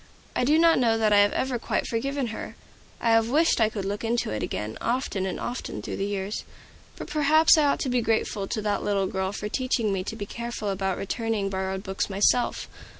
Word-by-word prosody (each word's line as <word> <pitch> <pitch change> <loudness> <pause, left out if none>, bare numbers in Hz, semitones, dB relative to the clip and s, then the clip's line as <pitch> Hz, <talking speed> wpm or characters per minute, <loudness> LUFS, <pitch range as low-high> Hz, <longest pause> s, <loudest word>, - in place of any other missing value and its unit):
I - - +1
do 300 +4 +4
not 330 -2 +5
know 230 -3 +3
that 215 -1 +3
I 205 - +6
have 205 0 +5
ever 255 -2 -1
quite - - -1
forgiven 270 +2 -2
her. - - -7 0.4
I 230 - +2
have 225 0 +4
wished 310 -1 +3
I 220 - +4
could 205 -3 -5
look 205 +2 -3
into 230 - 0
it 110 - -3
again, 105 +1 -3
often 230 -6 -1
and 185 - -4
often 245 +1 -4
through - - -5
the 195 - -1
years. 200 0 -3 0.5
But - - -7
perhaps 310 +1 +5
I 305 -2 +3
ought 280 - +2
to - - -1
be 250 -1 +2
grateful 220 -3 0
to 215 - -3
that 205 -1 0
little 200 -1 +1
girl 190 0 -2
for 210 +1 -4
teaching 230 -2 0
me 185 -1 -1
to 220 - -4
be 205 -2 -5
careful 235 -1 -4
about 190 -1 -1
returning 210 -1 -2
borrowed 190 0 -3
books 190 0 -2
myself. 205 +5 +1
220 Hz, 220 wpm, -26 LUFS, 195-245 Hz, 0.5 s, I